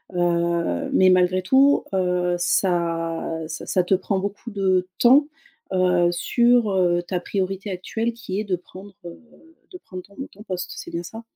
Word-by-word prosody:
heu. 170 - 0
Mais 185 0 +5
malgré 185 0 +2
tout, 270 +8 +4
heu, 180 -1 +1
ça 170 -2 0 0.3
-ça 155 0 -7
ça 185 - +1
te 180 - 0
prend 190 +1 0
beaucoup 200 +4 -5
de 190 -3 0
temps, 270 +5 +5 0.5
heu, 180 -2 +3
sur, 235 +5 +2
heu, 175 -2 +2
ta 180 +1 -3
priorité 195 +2 -3
actuelle, 220 +5 -3
qui 215 -4 -5
est - - -1
de 190 -3 0
prendre, 190 +3 -13
heu, 170 -1 -10 0.5
de 365 - -9
prendre 185 - -9
ton 200 +2 -21 0.2
ton 205 - -16
poste. 180 -3 -5
C'est - - -8
bien 170 +1 -4
ça? 220 +6 -9
185 Hz, 170 wpm, -23 LUFS, 175-200 Hz, 0.5 s, Mais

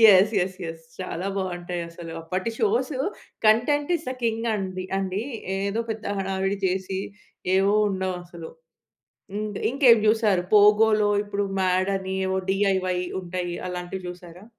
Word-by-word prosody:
Yes 205 +4 +4
yes 185 0 -9
yes. 165 0 -9 0.2
చాలా 185 0 -3
బాగుంటాయి 175 -2 -3
అసలు. 165 -1 -8
అప్పటి 185 +6 -2
shows 235 +6 +1 0.5
content 285 +8 +3
is 320 - -13
the - - -2
king 225 0 0
అండి 185 -2 -4
అండి. 195 +2 -2 0.4
ఏదో 200 +3 -1
పెద్ద 220 0 -6
హడావిడి 195 +1 -1
చేసి, 190 +1 -2 0.6
ఏవో 200 +2 +3
ఉండవు 190 -1 -1
అసలు. 170 -2 -9 0.8
హ్మ్. 210 +1 -2 0.2
ఇంకేం 255 -3 +6
చూసారు? 215 -4 +3
'పోగోలో' 210 0 +6
ఇప్పుడు 205 0 -2 0.2
మ్యాడ్ 185 0 +2
అని. 190 0 -4
ఏవో 190 0 0
డిఐవై 190 -2 +1 0.2
ఉంటాయి. 175 0 -3
అలాంటివి 180 +1 -5
చూసారా? 175 +1 -10
190 Hz, 135 wpm, -25 LUFS, 185-215 Hz, 0.8 s, ఇంకేం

